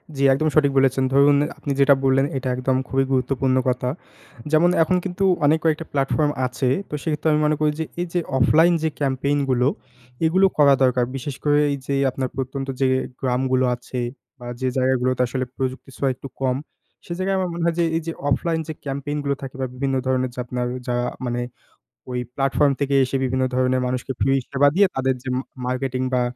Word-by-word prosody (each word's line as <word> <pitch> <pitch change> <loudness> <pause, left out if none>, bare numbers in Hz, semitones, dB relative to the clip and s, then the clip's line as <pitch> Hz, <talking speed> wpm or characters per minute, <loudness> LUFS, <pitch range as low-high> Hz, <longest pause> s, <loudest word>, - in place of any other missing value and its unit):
জ্বী, 140 - -1
একদম 155 +4 0
সঠিক 140 -2 +4
বলেছেন। 135 0 +3
ধরুন 140 +1 +5 0.2
আপনি 145 - -4
যেটা 140 0 +6
বললেন, 135 +1 +3
এটা 130 - -4
একদম 130 +1 0
খুবই 135 0 +1
গুরুত্বপূর্ণ 130 0 +1
কথা। 125 0 -1 0.6
যেমন 165 +3 +5
এখন 185 +3 +1
কিন্তু 190 +1 -2 0.2
অনেক 155 +2 +4
কয়েকটা 160 0 +1
প্ল্যাটফর্ম 145 +2 +1
আছে। 125 0 -1 0.2
তো - - -10
সেক্ষেত্রে 155 0 -1
আমি 150 - +2
মনে 150 0 +2
করি 150 -1 +3
যে, 160 - -1 0.2
এই 180 - -2
যে 175 - +2 0.2
অফলাইন 160 +7 +5
যে 160 - +2
ক্যাম্পেইন 140 +1 0
গুলো, 125 0 +2 0.6
এগুলো 185 +4 +4
করা 140 -2 +6
দরকার। 125 -1 +3
বিশেষ 135 0 -5
করে 145 0 +3
এই 140 - -1
যে 140 - 0 0.2
আপনার 130 0 -3
প্রত্যন্ত 135 +1 -4
যে 135 - +4 0.3
গ্রামগুলো 130 0 +1
আছে 125 +1 -7 0.4
বা 120 - -9
যে 130 - +1
জায়গাগুলোতে 130 0 +1
আসলে 130 +1 -2
প্রযুক্তির 130 0 -4
ছোঁয়া 135 -1 +1
একটু 135 - -9
কম। 130 -1 +1 0.5
সে 170 - -5
জায়গায় 190 +1 0
আমার 185 -1 -1
মনে 170 0 -3
হয় 170 - +1
যে - - +4
এই 165 - -2
যে, - - -1 0.2
অফলাইন 165 +3 0
যে 160 - -4
ক্যাম্পেইন 140 +2 -3
গুলো 140 0 0
থাকে 135 -1 -7
বা 130 - 0
বিভিন্ন 135 +1 -1
ধরণের 130 -1 +1
যে 125 - -8
আপনার 125 0 -3 0.2
যা 120 - 0 0.3
মানে, 120 0 -2 0.7
ওই 125 - -2 0.2
প্লাটফর্ম 140 +1 +2
থেকে 140 0 +1
এসে 130 - -4
বিভিন্ন 130 0 0
ধরনের 130 0 +2
মানুষকে 125 +1 -3
ফ্রি 135 - +3 0.2
সেবা 140 +1 +4
দিয়ে, 200 +1 +5
তাদের 130 0 +1
যে 130 - -4
ম - - 0 0.3
মার্কেটিং 130 0 -2
বা 125 - +3
135 Hz, 200 wpm, -22 LUFS, 130-150 Hz, 0.7 s, যেটা